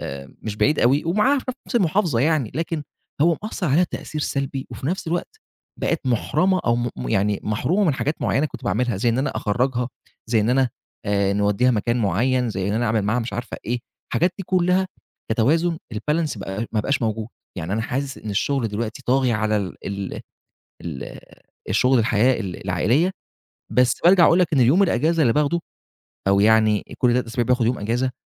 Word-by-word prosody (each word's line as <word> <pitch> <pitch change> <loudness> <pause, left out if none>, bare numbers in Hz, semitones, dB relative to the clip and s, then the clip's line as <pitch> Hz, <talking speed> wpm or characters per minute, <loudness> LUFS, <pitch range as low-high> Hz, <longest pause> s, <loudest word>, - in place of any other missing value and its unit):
آآ 70 0 -7
مش 105 -1 -4
بعيد 150 +6 +2
أوي، 135 +5 +3
ومعاها 210 +12 +3
في - - -7 0.2
نَفس 245 - -1
المحافظة 175 - +2
يعني، 145 -5 +1
لكن 165 0 -2 0.4
هو 165 +1 +4
مأثّر 210 -3 -3
عليها 160 +7 +4
تأثير 155 -3 -6
سلبي، 135 -1 -2
وفي 130 - -6
نَفس 180 +1 -2
الوقت 175 - -3 0.4
بقت 165 -5 -1
مُحرَمَة 175 - +1
أو 120 0 +2
مو 120 0 -1
مو 65 -1 -5
يعني 100 +6 +1
مَحرومَة 160 - 0
من 155 -7 +2
حاجات 150 +4 -2
معيّنة 145 +3 +1
كنت 130 -4 -10
باعملها، 110 +3 0
زي 110 +5 +1
إن 115 +2 +1
أنا 135 - 0
أخرّجها، 125 +3 0 0.4
زي 115 -1 +2
إن 110 +3 +1
أنا 130 0 +3 0.4
نودّيها 100 +4 +2
مكان 120 +1 0
معيّن، 120 +6 +1
زي 95 -2 -2
إن - - 0
أنا 120 +2 0
أعمل 110 -1 +1
معاها 110 +5 +1
مش 115 -2 -5
عارفة 120 +2 -5
إيه، 120 +2 -2 0.3
الحاجات 175 +2 +1
دي - - -3
كلّها، 185 +1 +2 0.4
كتوازُن 160 +9 +2 0.2
الbalance، 150 +3 -1
بقي 100 +3 -4
ما 110 - +1
بقاش 130 +4 -1
موجود. 110 -1 -2 0.3
يعني 85 +1 -4
أنا 110 +2 0
حاسس 135 +4 -3
إن 105 - -6
الشغل 120 +3 0
دلوقتي 110 +1 -4
طاغي 130 -1 +2
على 110 0 +1
ال 95 -4 -3
ال 100 -1 -4 0.6
ال 80 -6 -7 0.5
الشغل 125 -1 +3
الحياة، 115 +3 +2
ال 95 -5 -5
العائلية، 120 - +2 0.6
بس 125 0 +3
بارجَع 175 0 +7
أقول 170 - +5
لك 180 -3 +3
إن 135 - +3
يوم 135 +11 +5
الإجازة 165 -1 +2
اللي 120 -5 +4
باخده، 150 +5 +1 0.7
أو 100 0 +4
يعني 110 0 +4
إ - - -9
كل 125 -1 +3
3 125 +1 +1
أسابيع 120 +1 -1
باخد 125 0 +2
يوم 120 +2 0
إجازة، 120 +5 -1
125 Hz, 190 wpm, -22 LUFS, 110-155 Hz, 0.7 s, بارجَع